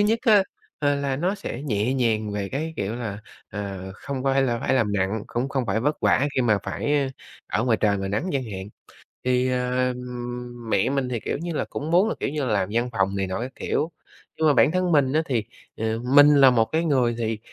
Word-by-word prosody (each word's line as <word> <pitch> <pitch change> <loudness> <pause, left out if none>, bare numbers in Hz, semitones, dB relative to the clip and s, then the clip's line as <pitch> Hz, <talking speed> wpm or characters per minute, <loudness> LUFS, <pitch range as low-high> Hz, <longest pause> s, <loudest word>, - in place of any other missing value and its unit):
nhất 220 +3 +3
á, 215 -6 +6 0.4
ờ, 145 -1 +2
là 140 -1 -1
nó 180 +7 0
sẽ 140 - -6
nhẹ 115 -2 0
nhàng 110 -5 0
về 100 -1 -3
cái, 155 +4 -3
kiểu 100 +3 -2
là, 110 -4 -4 0.3
ờ, 100 -2 -5
không 135 +5 -5
phải 135 0 +3
là 120 -3 0
phải - - +1
làm 105 -5 +1
nặng, 100 +2 -1
cũng 125 +3 -2
không 135 -3 -1
phải 105 +2 0
vất 150 +4 -1
vả 140 - +3
khi 130 - +2
mà 110 -4 +3
phải 145 -2 0 0.4
ở 115 - +1
ngoài 115 -3 +3
trời 105 -2 +3
ngoài 95 0 -3
nắng 105 - -1
chẳng 135 -2 -1
hạn. 95 -3 -6 0.6
Thì, 125 0 +2
ờm, 125 -1 -3
mẹ 100 - +2
mình 135 -2 -1
thì, 120 - -2
kiểu - - -3
như 170 +1 -4
là, - - -1
cũng 150 +3 -4
muốn 185 +6 +4
là, - - -2
kiểu - - -1
như, 145 -2 -2
làm 100 -5 0
văn 120 +1 +1
phòng 100 -2 0
này 95 -1 -1
nọ 95 +4 -3
các 130 +2 -4
kiểu, 160 +3 -1 0.5
nhưng 160 - +3
mà 150 - +5
bản 140 +3 +5
thân 185 -1 +1
mình 140 -4 +3
á 155 - +3
thì, 120 -7 0 0.3
à, 110 0 -1 0.2
mình 145 0 +9
là 135 -2 +8
một 115 -2 +3
cái 160 +6 -1
người 125 -6 +2
thì, 110 -2 -2
125 Hz, 235 wpm, -24 LUFS, 110-145 Hz, 0.6 s, mình